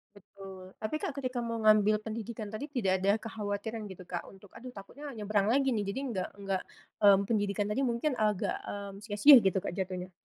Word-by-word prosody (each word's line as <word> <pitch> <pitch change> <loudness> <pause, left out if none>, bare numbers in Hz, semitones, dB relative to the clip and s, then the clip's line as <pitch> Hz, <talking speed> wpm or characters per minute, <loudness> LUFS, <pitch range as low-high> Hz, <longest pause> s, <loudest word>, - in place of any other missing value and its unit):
Betul. 190 -1 -12
Tapi, 215 +8 -2
Kak, 370 -5 -3
ketika 255 -3 -3
mau 230 -1 -2
ngambil 215 0 +4
pendidikan 220 -1 -6
tadi, 220 +7 -5
tidak 240 -10 0
ada 195 +2 +3
kekhawatiran 215 0 -4
gitu, 190 -2 -10
Kak, 175 -1 -6
untuk, 195 0 -15
"Aduh, 250 +1 -11
takutnya 240 +9 -10
nyebrang 210 -2 0
lagi 270 +3 +3
nih, 210 -4 -1
jadi 200 +7 -3
enggak 185 -4 -2
enggak 195 -2 -3 0.4
mmm, 200 -1 +6
pendidikan 205 -2 0
tadi 220 - 0
mungkin 240 +5 0
agak, 210 -3 0
mmm, 200 -1 -6
sia-sia," 240 +6 +8
gitu, 190 -3 +2
Kak, - - -3
jatuhnya? 185 0 -4
210 Hz, 185 wpm, -30 LUFS, 195-230 Hz, 0.4 s, sia-sia